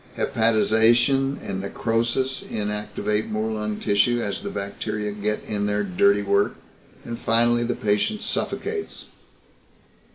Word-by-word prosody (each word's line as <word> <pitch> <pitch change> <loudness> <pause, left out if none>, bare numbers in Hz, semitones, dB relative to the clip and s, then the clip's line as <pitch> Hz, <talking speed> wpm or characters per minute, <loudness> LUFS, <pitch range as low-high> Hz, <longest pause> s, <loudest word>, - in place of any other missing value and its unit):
Hepatization 115 +5 +3
and 95 -1 -3
necrosis 120 +6 -1
inactivate 105 0 -2
more 110 +1 -1
lung 105 -1 -3
tissue 105 +4 +2
as 100 -4 -3
the - - -4
bacteria 105 +1 -4
get 105 +1 -2
in 105 -1 -1
their 105 0 0
dirty 100 +2 +3
work, 100 0 +2 0.5
and 115 0 -5
finally 120 +1 +3
the 120 0 -1
patient 120 - 0
suffocates." 425 -2 -3
110 Hz, 120 wpm, -24 LUFS, 105-120 Hz, 0.5 s, Hepatization